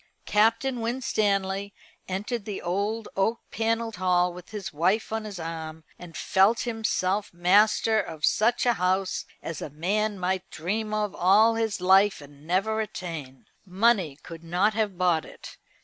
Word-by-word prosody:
Captain 225 +4 +2
Winstanley 200 -5 -1 0.3
entered 205 +4 -3
the 205 -2 -4
old 205 +5 -2
oak 220 +4 +1
panelled 225 -1 -1
hall 180 -1 +2
with 180 0 -11
his 205 -5 -6
wife 190 +9 +1
on 220 -1 -2
his 200 -4 -7
arm, 160 -1 -6 0.2
and 165 -3 -10
felt 195 +5 +3
himself 210 -4 -1
master 210 +5 +3
of 155 -5 -3
such 235 +4 +2
a 240 - +4
house 185 +1 0 0.2
as 165 -3 -5
a - - -5
man 200 +8 -1
might 185 0 -2
dream 210 +6 -3
of 210 -2 -1
all 210 +5 +5
his 225 -3 -1
life 190 +2 +4
and 145 +1 -15
never 205 +5 +1
attain. 165 -10 -7 0.2
Money 190 -6 +1
could 165 -1 -10
not 180 +6 +1
have 210 -4 -1
bought 175 -4 +2
it. - - -12
195 Hz, 150 wpm, -26 LUFS, 175-220 Hz, 0.3 s, all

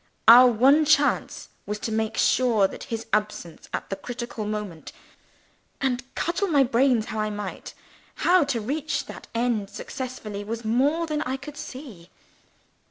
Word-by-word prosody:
Our 245 +3 +10
one 265 +7 +5
chance 290 -1 +1 0.2
was 210 +1 -2
to 225 - -3
make 220 0 -1
sure 235 -6 +3
of - - -5
his 230 -3 -5
absence, 210 -6 -2
at - - -5
the - - 0
critical 235 -1 -6
moment 210 -6 -5 0.9
and, 265 -1 -1
cudgel 350 +4 -1
my 290 -6 +4
brains 245 -2 +2
as - - -5
I 215 -1 -1
might, 205 -2 -6 0.4
how 360 -1 +4
to 275 -4 -1
reach 285 +7 -2
that - - -10
end 230 -4 0
successfully 215 -2 -6
was 225 +2 -5
more 280 +9 +2
than 305 -2 -2
I 260 -2 -2
could 275 +2 -10
see. 245 - -9
240 Hz, 155 wpm, -25 LUFS, 215-275 Hz, 0.9 s, Our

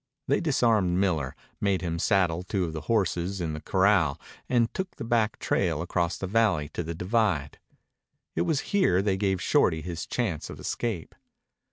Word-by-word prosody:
They 140 - +2
disarmed 115 - +2
Miller, 80 -9 0 0.2
made 100 -2 +1
him 85 -1 -2
saddle 90 -4 +2
two 95 0 -1
of 80 - -5
the 80 - -4
horses 95 -3 0
in 80 -3 -2
the 75 - -6
corral, 95 -7 +2 0.3
and 120 -2 +2
took 190 -1 -4
the - - -6
back 115 -2 +1
trail 85 -6 0
across 85 0 -1
the - - -4
valley 95 -7 +2
to 85 - -4
the 85 0 -5
divide. 90 -6 0 0.8
It 80 - +1
was 135 - +1
here 95 - +3
they 100 -2 +1
gave 95 -1 0
Shorty 80 -3 +2
his 85 -2 -5
chance 105 -11 -2
of - - -8
escape. 110 -9 -3
95 Hz, 175 wpm, -27 LUFS, 85-110 Hz, 0.8 s, here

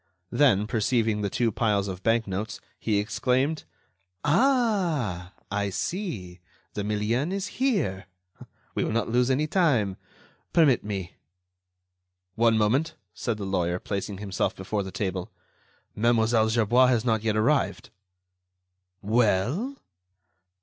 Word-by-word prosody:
Then, 120 -9 +4
perceiving 110 0 +1
the 100 - -1
two 115 +3 0
piles 105 -2 +1
of 95 -1 -6
bank 115 +1 +2
notes, 100 +3 -4 0.2
he 110 -2 0
exclaimed: 130 +8 0 0.6
"Ah! 170 - +1 0.2
I 100 0 0
see! 100 - -4 0.3
the 105 - -3
million 105 - 0
is 195 +4 -4
here. 185 - 0 0.7
We - - 0
will - - -1
not 115 -1 0
lose 125 +2 +2
any 135 +3 +2
time. 135 - +1 0.6
Permit 150 -8 +4
me." 95 -4 -5 1.2
"One 115 +1 +3
moment," 120 +9 +1 0.2
said 115 -3 -3
the 100 - -5
lawyer, 90 -2 0
placing 100 +1 -4
himself 100 -1 -2
before 100 +2 -3
the 95 - -5
table. 95 -3 -3 0.6
"Mlle. 115 0 +3
Gerbois 120 +3 +4
has 120 -2 +2
not 110 -3 +2
yet 110 -1 0
arrived." 110 - +1 1.1
"Well?" 120 - +1
110 Hz, 120 wpm, -26 LUFS, 100-130 Hz, 1.2 s, Then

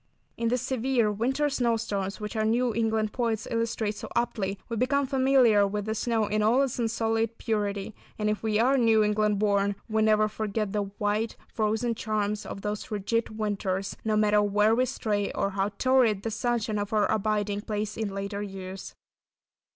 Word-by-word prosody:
In 230 - -1
these 250 0 0
severe 255 -3 +1
winter 260 +8 0
snow 245 -5 +1
storms 200 -3 -3
which 210 +1 -5
our 220 - +1
New 235 +2 +1
England 220 -1 0
poets 230 -3 -1
illustrate 230 -2 -1
so - - -8
aptly, 200 -5 -1
we 230 - -3
become 270 +4 +1
familiar 260 -6 +4
with 205 0 -3
the 220 - -1
snow 225 0 0
in 210 +1 0
all 235 +6 +4
its 260 -2 -3
unsullied 225 0 0
purity, 205 -2 -2 0.2
and 210 - -1
if 210 0 0
we 215 -1 0
are 260 +4 +3
New 225 -2 +4
England 210 0 +1
born, 200 -1 +1
we 220 -1 +1
never 215 0 +4
forget 215 -1 -3
the 205 -1 0
white, 210 +2 -1
frozen 220 +2 0
charms 210 -2 -2
of 195 - -6
those 210 0 -4
rigid 215 +2 -2
winters, 195 -2 -2
no 215 -1 +1
matter 210 0 +4
where 210 +2 +3
we 255 +2 +2
stray, 205 -3 -1
or 195 - -1
how 195 +1 0
torrid 250 -6 +3
the 225 - -2
sunshine 225 -2 -1
of 205 +2 -4
our 210 -1 +3
abiding 210 -1 0
place 210 0 -3
in 220 -2 -2
later 200 +1 -4
years. 190 -1 -7
215 Hz, 180 wpm, -27 LUFS, 205-230 Hz, 0.2 s, familiar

